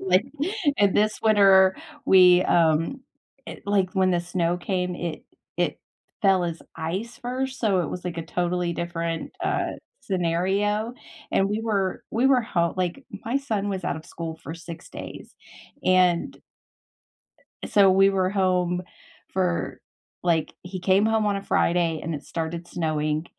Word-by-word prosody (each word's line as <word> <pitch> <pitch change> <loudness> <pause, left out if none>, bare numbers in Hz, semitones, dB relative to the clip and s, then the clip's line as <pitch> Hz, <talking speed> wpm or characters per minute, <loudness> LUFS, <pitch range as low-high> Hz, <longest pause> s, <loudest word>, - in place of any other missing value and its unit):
like 190 +3 +3 0.5
and 200 -2 +3
this 215 +1 +1
winter, 195 -3 +6 0.3
we, 180 -1 +7
um 165 - +2 0.5
it - - -9
like 195 -3 +2
when 185 -1 +3
the 175 -1 +1
snow 175 0 -1
came, 180 0 -2
it 170 -2 -5 0.3
it - - 0 0.4
fell 195 -3 +4
as 170 -1 -4 0.2
ice 185 +9 -4
first, 260 +2 -3
so 200 -5 +2
it 160 - -2
was, 180 - -6
like, 170 -2 -4
a - - -2
totally 175 0 -1
different, 170 -1 -3
uh, - - 0 0.3
scenario, 195 +5 0 0.4
and, 195 0 +2
we 210 +2 -1
were 200 -4 -1
we 240 +4 +2
were 260 -2 +5
ho 170 -7 0
like, 185 +9 -2 0.2
my 235 +4 0
son 215 -7 -2
was 190 -3 -3
out 140 - -1
of 160 - -9
school 165 -2 -6
for 160 - -6
6 170 0 -10
days. - - -9 0.5
And 180 -2 +3 1.3
so 195 -2 +5
we 195 +1 +5
were 190 -1 +1
home 180 -2 +1 0.5
for 180 -2 -1 0.4
like, 165 -3 +1
he 185 +1 -6
came 190 +3 +3
home 220 -1 +2
on 205 -1 +1
a 195 - -7
Friday, 170 -4 +1
and 165 -1 -3
it 145 - -8
started 170 +1 -4
snowing. 155 -2 -1
185 Hz, 155 wpm, -25 LUFS, 170-200 Hz, 1.3 s, we